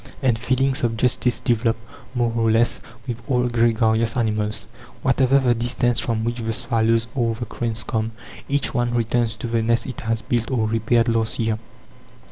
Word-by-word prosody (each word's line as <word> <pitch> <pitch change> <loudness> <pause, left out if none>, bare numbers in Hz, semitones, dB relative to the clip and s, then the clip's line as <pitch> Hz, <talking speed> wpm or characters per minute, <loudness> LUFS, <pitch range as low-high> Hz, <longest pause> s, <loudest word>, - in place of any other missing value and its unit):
And 125 -3 +3
feelings 130 +3 0
of 115 -1 0
justice 125 +1 +1
develop, 115 -1 +1 0.4
more 120 -2 +1
or 115 -1 +2
less, 115 +2 +2 0.3
with 120 -1 -4
all 125 -2 +2
gregarious 115 -1 +2
animals. 105 -3 0 0.4
Whatever 130 +1 +4
the 130 -3 +3
distance 120 0 +1
from 110 -2 -1
which 120 +1 -1
the 115 0 -2
swallows 115 0 +1
or 115 -4 0
the 120 +2 -5
cranes 115 0 -3
come, 110 0 -2 0.4
each 140 0 +1
one 120 -1 0
returns 115 -1 +1
to 110 - -7
the 115 -1 0
nest 115 0 +1
it 135 +2 -6
has 115 -1 -2
built 120 -2 -1
or 120 -5 +1
repaired 115 +2 +2
last 115 -2 +1
year. 110 -1 0
115 Hz, 175 wpm, -22 LUFS, 115-120 Hz, 0.4 s, Whatever